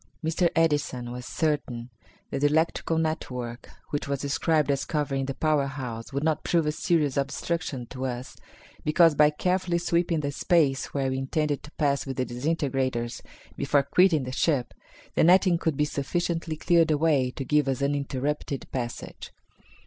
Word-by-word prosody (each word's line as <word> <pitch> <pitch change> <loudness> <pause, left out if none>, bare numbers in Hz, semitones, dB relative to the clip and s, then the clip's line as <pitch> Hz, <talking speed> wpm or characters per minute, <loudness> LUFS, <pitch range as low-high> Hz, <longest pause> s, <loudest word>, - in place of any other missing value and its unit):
Mr. 165 +2 +2
Edison 145 -7 +1
was 125 0 -7
certain 130 -6 -2 0.4
that 140 - -1
the 145 - +5
electrical 160 +1 +1
network 125 -7 -3 0.2
which 145 - -2
was 140 -1 -1
described 145 +1 +1
as 140 - 0
covering 140 -4 -1
the 135 - -3
power 150 -1 +1
house 125 -4 -6
would 140 +1 -2
not 160 -1 +1
prove 170 -2 +2
a 150 - +1
serious 150 -3 +1
obstruction 140 -1 -2
to 130 +2 -4
us, 125 0 -6 0.5
because 165 +1 +5
by 150 0 +5
carefully 180 +3 0
sweeping 170 -1 +1
the 145 -1 -2
space 145 -3 +2
where 135 -2 -1
we 130 - -1
intended 145 +2 -1
to - - -11
pass 140 -2 0
with 135 - -4
the 130 - 0
disintegrators 130 -3 -1 0.3
before 140 0 +2
quitting 160 +1 +3
the 130 - -5
ship, 135 -2 0 0.4
the - - +3
netting 180 0 +5
could 160 -5 -1
be 150 - +3
sufficiently 165 +3 -2
cleared 170 +1 +3
away 150 -4 +2
to 135 +1 -6
give 150 -1 +2
us 135 0 -1
uninterrupted 140 0 -2
passage. 120 -2 -5
145 Hz, 165 wpm, -26 LUFS, 135-160 Hz, 0.5 s, the